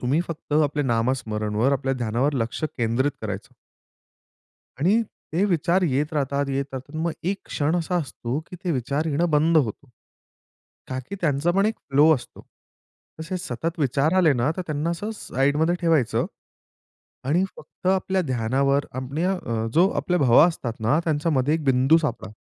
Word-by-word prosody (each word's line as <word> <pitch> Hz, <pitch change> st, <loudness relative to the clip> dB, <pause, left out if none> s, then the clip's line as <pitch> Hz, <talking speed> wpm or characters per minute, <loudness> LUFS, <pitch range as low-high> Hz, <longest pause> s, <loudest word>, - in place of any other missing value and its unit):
तुम्ही 135 Hz, +7 st, +1 dB
फक्त 160 Hz, -2 st, -7 dB
आपल्या 145 Hz, 0 st, 0 dB
नामस्मरणवर 115 Hz, -1 st, 0 dB
आपल्या 135 Hz, -1 st, 0 dB
ध्यानावर 125 Hz, +4 st, 0 dB
लक्ष 115 Hz, +3 st, -2 dB, 0.2 s
केंद्रित 120 Hz, +5 st, +1 dB
करायचं. 105 Hz, -2 st, -6 dB, 1.3 s
आणि 205 Hz, +9 st, +3 dB, 0.3 s
ते 180 Hz, +5 st, +2 dB
विचार 180 Hz, -1 st, +2 dB
येत 150 Hz, 0 st, 0 dB
राहतात, 140 Hz, -1 st, 0 dB
येत 135 Hz, 0 st, -1 dB
राहतात 135 Hz, +4 st, -7 dB
मग 165 Hz, 0 st, -1 dB
एक 190 Hz, +3 st, 0 dB
क्षण 155 Hz, +4 st, 0 dB
असा 175 Hz, +1 st, -1 dB
असतो 130 Hz, -3 st, -4 dB
की 180 Hz, -, -10 dB
ते 180 Hz, -, 0 dB
विचार 140 Hz, +4 st, -1 dB
येणं 165 Hz, +3 st, +1 dB
बंद 160 Hz, +2 st, +3 dB
होतो. 135 Hz, 0 st, 0 dB, 1.0 s
ताकी 130 Hz, +7 st, -5 dB
त्यांचा 150 Hz, 0 st, +1 dB
पण 195 Hz, +4 st, +2 dB
एक 220 Hz, -, 0 dB, 0.2 s
फ्लो 150 Hz, +4 st, +6 dB
असतो. 120 Hz, -4 st, -9 dB, 0.8 s
तसे 185 Hz, +4 st, -4 dB
सतत 165 Hz, +4 st, -4 dB
विचार 145 Hz, +2 st, +1 dB
आले 165 Hz, -5 st, +5 dB
ना 125 Hz, +3 st, +1 dB
तर 185 Hz, -, -2 dB
त्यांना 155 Hz, +2 st, -1 dB
असं 205 Hz, +6 st, -3 dB
साईडमध्ये 150 Hz, 0 st, +1 dB
ठेवायचं. 160 Hz, -9 st, +2 dB, 1.0 s
आणि 165 Hz, +8 st, +2 dB
फक्त -, -, -12 dB
आपल्या 190 Hz, 0 st, +1 dB
ध्यानावर 135 Hz, +1 st, +1 dB
अपण्या 140 Hz, +9 st, -1 dB
अ, 115 Hz, -11 st, -3 dB
जो 180 Hz, +4 st, +5 dB
आपल्या 180 Hz, 0 st, 0 dB
भवा 135 Hz, +3 st, +6 dB
असतात 140 Hz, -9 st, -3 dB
ना 115 Hz, +8 st, +2 dB
त्यांच्यामध्ये 150 Hz, -2 st, +1 dB
1 160 Hz, -, -2 dB
बिंदू 135 Hz, +3 st, +4 dB
सापडा. 150 Hz, -10 st, -3 dB
145 Hz, 155 wpm, -24 LUFS, 130-165 Hz, 1.3 s, फ्लो